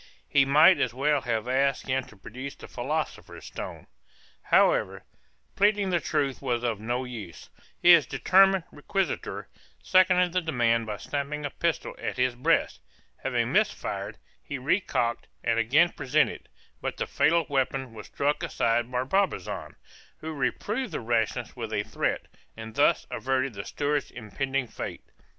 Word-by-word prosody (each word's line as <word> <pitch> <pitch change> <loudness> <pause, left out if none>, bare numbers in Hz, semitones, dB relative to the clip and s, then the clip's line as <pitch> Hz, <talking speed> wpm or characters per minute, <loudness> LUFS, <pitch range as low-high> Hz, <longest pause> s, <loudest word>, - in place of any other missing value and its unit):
He 140 -1 +4
might 155 +7 +6
as 120 -1 0
well 145 +1 +2
have 115 -1 -2
asked 135 +1 +1
him 130 0 0
to 110 - -17
produce 130 +8 -8
the - - -12
philosopher's 150 +6 -4
stone. - - -7 0.6
However, - - +3 0.5
pleading 205 -1 +2
the 175 - +2
truth 140 -4 -1
was 120 -3 -1
of 115 -4 -1
no 120 +4 -2
use; 115 -9 -9 0.3
his 170 -3 +7
determined 195 -1 +4
requisitor 195 +6 -2 0.4
seconded 180 -1 +4
the 185 - +2
demand 115 -8 +1
by 105 - -4
snapping 145 +1 -4
a 145 - -3
pistol 170 -1 -2
at - - -4
his 125 0 +2
breast; 125 - +1 0.4
having - - -1
missed - - +3
fire, - - -5 0.3
he 140 - -5
recocked, 130 -4 0 0.2
and 115 0 +1
again 145 +10 +4
presented; 150 +3 0 0.3
but - - -3
the - - -1
fatal 170 0 +2
weapon 135 -2 -1
was 110 - -10
struck 145 +1 -1
aside 120 +1 0
by 125 0 0
Barbazan, 185 - -1 0.4
who 160 0 -6
reproved 200 - -2
the - - -2
rashness 115 -1 -1
with - - -5
a - - 0
threat, - - -2 0.3
and 110 0 -8
thus - - +3
averted 130 -1 -1
the 100 -1 -7
steward's 145 0 -1
impending 130 +4 -3
fate. - - -7
135 Hz, 150 wpm, -27 LUFS, 120-160 Hz, 0.6 s, his